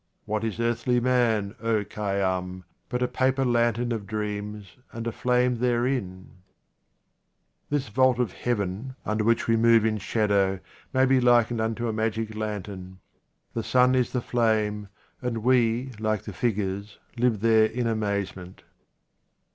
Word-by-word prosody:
What 110 +1 -2
is 110 0 -3
earthly 120 +1 +1
man, 120 -5 +1
O 115 -2 +1
Khay 105 -1 -3
yam, 95 -1 -2 0.3
but 125 0 -1
a - - +2
paper 130 +1 +1
lantern 120 0 +1
of 110 -4 -3
dreams 105 -1 -5
and 115 0 -6
a 115 - -1
flame 125 0 +1
therein? 120 -7 -1 1.3
This 145 -2 -1
vault 130 +2 +3
of 125 -6 0
heaven, 115 +2 -3
under 110 0 0
which 115 +1 +2
we 115 - +3
move 115 -1 +5
in 110 -1 0
shadow, 100 -2 +1 0.3
may 130 0 +3
be 130 -1 +3
likened 120 -2 +3
unto 115 +1 -1
a 110 - -1
magic* 110 0 -2
lantern; 100 -3 -5 0.6
the 115 - -2
sun 125 +2 +3
is 125 -1 +1
the 125 - -1
flame, 110 -4 0 0.3
and 115 -3 -3
we, 125 0 +2
like 110 -2 -1
the - - -7
figures, 100 -3 -2 0.2
live 120 -4 +1
there 110 -1 +5
in 120 +2 -3
amazement. 100 -4 -3
115 Hz, 145 wpm, -26 LUFS, 105-120 Hz, 1.3 s, move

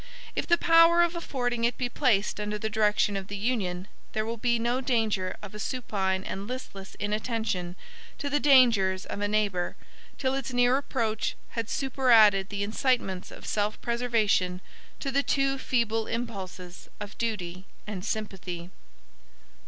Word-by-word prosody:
If - - -2
the 340 - +5
power 330 +1 +6
of 345 0 0
affording 245 -8 -2
it 235 +1 +1
be 250 - -1
placed 235 -6 +1
under 210 0 -2
the 220 +1 -3
direction 210 -1 +2
of 195 -1 -4
the 205 - -5
Union, 195 -5 -1 0.3
there 215 0 -1
will 230 +1 -3
be 235 +1 +1
no 240 +3 0
danger 220 -7 0
of 205 - -8
a 210 - -8
supine 195 -6 -1
and 195 +1 -5
listless 215 -6 -7
inattention 210 -4 -2 0.4
to 290 - -4
the 290 +1 +1
dangers 230 -10 +5
of 205 - -5
a 205 - +1
neighbor, 205 -4 0 0.4
till 260 -1 0
its 270 -2 -3
near 245 +1 +4
approach 230 -6 -1
had 230 -2 -4
superadded 230 -8 +4
the 200 -1 -2
incitements 215 -4 0
of - - -11
self 210 0 -1
preservation 230 -7 +1 0.4
to 275 - -3
the 275 +1 +3
too 275 -1 +1
feeble 225 -4 0
impulses 190 -6 -6
of 210 0 -7
duty 185 -5 -3 0.2
and 200 -4 -5
sympathy. 185 -5 -4
220 Hz, 155 wpm, -28 LUFS, 195-250 Hz, 0.4 s, power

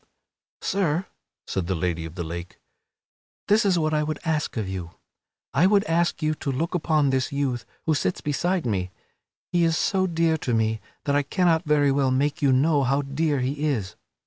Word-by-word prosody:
"Sir," 185 -2 0 0.4
said 95 -3 -2
the 95 - 0
Lady 85 -1 -2
of 80 +1 -9
the 85 - -3
Lake, 85 +2 -7 0.9
"this 210 +2 +4
is 190 -3 +3
what 155 -1 +1
I 150 - +2
would 155 0 -2
ask 155 -5 -1
of 110 -3 -2
you. 90 -3 -6 0.6
I 180 - +4
would 200 0 +4
ask 170 -2 0
you 155 0 +2
to 140 -2 -3
look 160 +8 -2
upon 155 -5 +2
this 130 -1 0
youth 135 -4 -2 0.2
who 160 - +2
sits 90 -11 0
beside 175 +4 -1
me. 95 -5 -1 0.6
He 175 -1 +2
is 165 0 +2
so 190 -1 +1
dear 165 -2 +1
to 120 -4 -1
me 110 -1 0 0.2
that 140 - 0
I 145 - +4
cannot 170 +2 +1
very 145 -2 +3
well 135 -1 +2
make 140 +3 0
you 140 -2 +4
know 145 +3 +3
how 135 +2 +1
dear 145 0 0
he 140 +4 -2
is. 110 -10 -2
145 Hz, 195 wpm, -25 LUFS, 125-165 Hz, 0.9 s, this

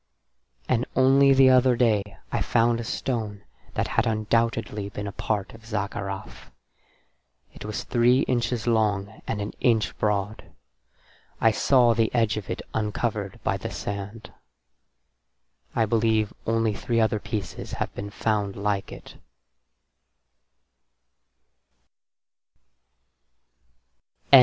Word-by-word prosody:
And 120 +1 +1
only 135 +1 +5
the 135 -1 +6
other 130 -1 +5
day 115 -4 +3 0.3
I - - -1
found 115 0 +2
a - - -3
stone 110 -4 -3 0.3
that - - 0
had - - +1
undoubtedly 110 -1 0
been 100 0 -6
a 100 - -4
part 100 0 -3
of 115 0 -14
Zaccarath, 100 -3 -5 1.0
it - - -10
was 105 0 -4
three 125 +1 +3
inches 120 -3 -1
long 110 -3 0
and 110 - -2
an 100 0 -3
inch 115 -3 +2
broad; 105 0 -1 1.0
I 115 - +5
saw 120 +1 +4
the 115 -1 +1
edge 115 -2 +2
of 105 -3 -6
it - - -4
uncovered 105 -2 -2
by - - 0
the - - -5
sand. 100 +2 -6 1.4
I 115 - +3
believe 110 -1 +2
that - - -21
only 115 -1 +1
three 115 +3 -1
other 110 -1 +2
pieces 100 -6 -5
have - - -3
been 100 +1 -6
found 105 -1 -1
like 100 -1 -2
it. - - -11
110 Hz, 120 wpm, -25 LUFS, 105-115 Hz, 1.4 s, the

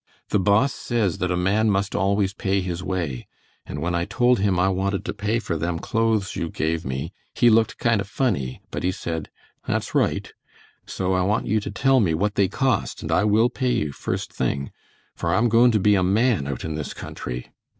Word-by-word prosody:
The 105 - +2
Boss 105 +8 +3
says 110 -8 -1
that 90 - 0
a 90 - 0
man 100 +5 +2
must 100 0 0
always 100 0 +1
pay 100 0 0
his 90 -1 -4
way, 85 -10 -3 0.4
and 75 +3 -5
when 85 +1 -1
I 85 0 0
told 125 +2 +2
him 95 -2 +1
I 90 - +3
wanted 95 +1 -1
to - - -3
pay 105 +3 -1
for 90 -8 -2
them 85 +2 -2
clothes 110 +1 0
you 85 - -2
gave 80 +1 -1
me 65 +6 -4 0.2
he 120 -1 +5
looked 110 0 +3
kind 115 -3 +2
o' - - -2
funny, 95 - -2
but - - -3
he 90 - +1
said 80 -3 -4 0.4
"that's - - -2
right," - - 0 0.5
so 95 0 -1
I 95 - +2
want 100 +4 +1
you 110 +1 +1
to 100 - -5
tell 130 +6 +3
me 85 -8 +2
what 105 +5 0
they 100 -2 +3
cost 130 +3 -1
and 80 - -3
I 90 +5 +3
will 110 +3 +4
pay 125 -2 0
you 75 -2 -1
first - - -4
thing, 70 0 -2 0.4
for 85 +1 -1
I'm 115 +5 +3
goin' 120 +2 +6
to 110 -3 +2
be 105 +2 +4
a 95 - +3
man 100 - +2
out 70 -2 -4
in 80 - -3
this 75 -2 -5
country. - - -6
95 Hz, 215 wpm, -23 LUFS, 85-110 Hz, 0.5 s, goin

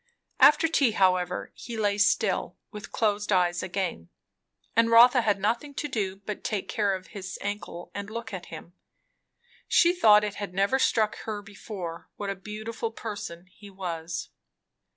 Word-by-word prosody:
After 300 +2 +7
tea, 275 -8 +2
however, 185 -3 +1
he 235 -2 -8
lay 205 -1 +1
still, 205 - +1
with 210 -3 -9
closed 210 -1 0
eyes 175 -2 +2
again; 180 - -3 0.7
and 230 0 +4
Rotha 245 +2 +7
had 210 -3 +1
nothing 235 +8 -1
to 295 - -2
do 205 -8 -2
but 200 +1 -7
take 210 -3 -2
care 205 -3 0
of 185 0 -10
his 195 -3 -7
ankle 200 -4 -5
and 200 0 -5
look 225 -1 -6
at 185 -2 -6
him. 165 +2 -10 0.9
She 345 0 +5
thought 210 -12 +6
it 210 -1 -2
had 195 -3 -5
never 200 +7 +2
struck 220 -5 +2
her 210 -2 -4
before, 195 -4 -8
what 200 -1 -3
a - - -4
beautiful 215 +4 -5
person 205 -6 -7
he 200 +2 -15
was. 170 -3 -5
205 Hz, 160 wpm, -27 LUFS, 185-225 Hz, 0.9 s, After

